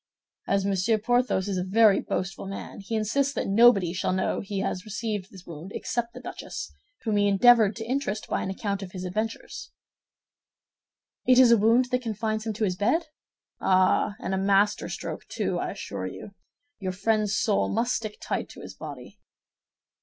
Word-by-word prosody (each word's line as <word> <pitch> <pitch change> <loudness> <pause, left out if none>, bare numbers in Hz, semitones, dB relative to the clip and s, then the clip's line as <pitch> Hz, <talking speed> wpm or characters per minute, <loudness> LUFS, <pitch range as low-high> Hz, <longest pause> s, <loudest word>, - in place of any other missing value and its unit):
As 195 -1 +1
Monsieur 200 +3 +2
Porthos 245 -3 +1
is 190 -2 -1
a - - -1
very 205 +1 +5
boastful 190 +1 -3
man, 195 +1 -7
he 200 +3 -4
insists 270 +6 0
that - - -1
nobody 200 -4 +5
shall 185 - -1
know 185 - 0
he 195 -1 -3
has 185 - -2
received 215 -2 -4
this 190 -3 -14
wound 170 +3 -9
except 235 0 -3
the - - -7
duchess, 255 - -7 0.3
whom 215 -3 0
he 205 0 +3
endeavored 215 +1 +5
to 225 - -6
interest 245 -4 -2
by - - -1
an - - -3
account 200 +1 -3
of 185 -2 -8
his 185 -1 -6
adventure." 215 +5 -3 1.8
"It 255 -1 +6
is 255 -2 +7
a 235 - +7
wound 235 +4 +3
that 250 0 +1
confines 220 -1 -2
him 220 - -1
to 215 +2 -3
his 185 -3 +1
bed?" 305 - +1 0.5
"Ah, 185 +2 +3
and 190 - -3
a 190 - 0
master 200 +1 +2
stroke, - - -6
too, - - -2
I - - -2
assure - - -5
you. - - -9 0.5
Your 185 -2 -3
friend's 215 +1 +1
soul 215 -3 +1
must 235 +3 0
stick 215 -2 -4
tight - - -3
to - - -11
his - - -9
body." - - -10
210 Hz, 185 wpm, -26 LUFS, 195-230 Hz, 1.8 s, is